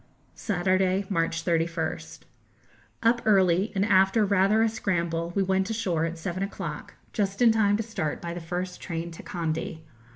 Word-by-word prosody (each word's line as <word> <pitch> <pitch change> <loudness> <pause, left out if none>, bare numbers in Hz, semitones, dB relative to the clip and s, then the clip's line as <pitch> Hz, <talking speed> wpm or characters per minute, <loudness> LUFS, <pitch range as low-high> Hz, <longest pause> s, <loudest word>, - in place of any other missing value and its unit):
Saturday, 185 0 +1
March 165 -2 -1
31st. 165 -1 -2 0.8
Up 235 +1 +3
early, 190 -1 +3
and 195 +1 +2
after 195 +1 +4
rather 200 +2 +3
a - - +4
scramble 170 -6 -1
we 200 - +2
went 190 +1 +1
ashore 185 -8 0
at 165 0 -4
seven 175 +2 -4
o'clock, 190 -6 -5 0.2
just 200 -2 -1
in 240 -2 +6
time 205 -2 +3
to 225 - -2
start 180 -9 -3
by 170 -1 -5
the 175 - -6
first 180 +2 -4
train 170 0 -4
to 165 - -10
Kandy. 160 -1 -3
185 Hz, 160 wpm, -26 LUFS, 170-200 Hz, 0.8 s, in